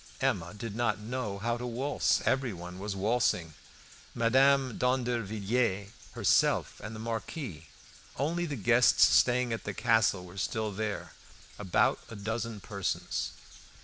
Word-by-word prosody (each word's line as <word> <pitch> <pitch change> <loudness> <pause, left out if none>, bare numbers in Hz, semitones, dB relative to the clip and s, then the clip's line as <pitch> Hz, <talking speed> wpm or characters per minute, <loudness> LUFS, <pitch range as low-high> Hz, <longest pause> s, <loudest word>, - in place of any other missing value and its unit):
Emma 100 -11 0
did 105 0 -6
not 115 -4 +1
know 110 -1 -4
how 120 +3 -1
to 125 +1 -5
waltz. 130 +5 +1
Everyone 95 -9 -1
was 100 0 -4
waltzing, 95 -6 +1 0.6
Mademoiselle 130 +2 +4
d'Andervilliers 115 -4 0 0.2
herself - - +2
and 110 +1 -6
the - - -7
Marquis; 110 - -5 0.5
only 170 +4 0
the 145 - -3
guests 120 +2 +5
staying 125 -1 +3
at 115 - -4
the 105 - -5
castle 110 -5 +2
were 90 +2 -12
still 110 +2 -1
there, 105 +1 -4 0.5
about 95 -4 +2
a 115 - -8
dozen 110 +1 -3
persons. 100 -1 -3
115 Hz, 130 wpm, -30 LUFS, 100-125 Hz, 0.6 s, guests